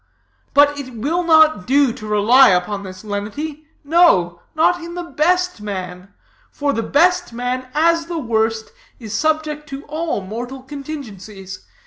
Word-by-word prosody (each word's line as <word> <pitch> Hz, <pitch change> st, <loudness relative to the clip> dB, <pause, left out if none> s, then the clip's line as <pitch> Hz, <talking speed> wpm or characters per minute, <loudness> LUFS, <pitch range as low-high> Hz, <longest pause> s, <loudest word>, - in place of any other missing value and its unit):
But 290 Hz, 0 st, +5 dB
it 255 Hz, -3 st, -8 dB
will 300 Hz, +11 st, -1 dB
not 315 Hz, -, +4 dB
do 275 Hz, -2 st, +3 dB
to 215 Hz, -, -9 dB
rely 220 Hz, +6 st, +5 dB
upon 185 Hz, +2 st, 0 dB
this 185 Hz, 0 st, -10 dB
lenity, 280 Hz, +10 st, -5 dB, 0.2 s
no, 280 Hz, -, +3 dB
not 335 Hz, +3 st, +2 dB
in 340 Hz, +1 st, -8 dB
the 355 Hz, -, -4 dB
best 360 Hz, -2 st, 0 dB
man; 185 Hz, -2 st, -6 dB, 0.4 s
for 285 Hz, -1 st, -2 dB
the 230 Hz, -, -1 dB
best 355 Hz, +3 st, +2 dB
man, 250 Hz, +2 st, -3 dB
as 330 Hz, +1 st, +2 dB
the 340 Hz, -1 st, -4 dB
worst, 225 Hz, -4 st, -1 dB, 0.3 s
is 220 Hz, -3 st, -8 dB
subject 305 Hz, +3 st, -1 dB
to 275 Hz, +1 st, -7 dB
all 310 Hz, -6 st, -3 dB
mortal 240 Hz, +7 st, -7 dB
contingencies. 215 Hz, -10 st, -9 dB
270 Hz, 145 wpm, -19 LUFS, 210-315 Hz, 0.4 s, But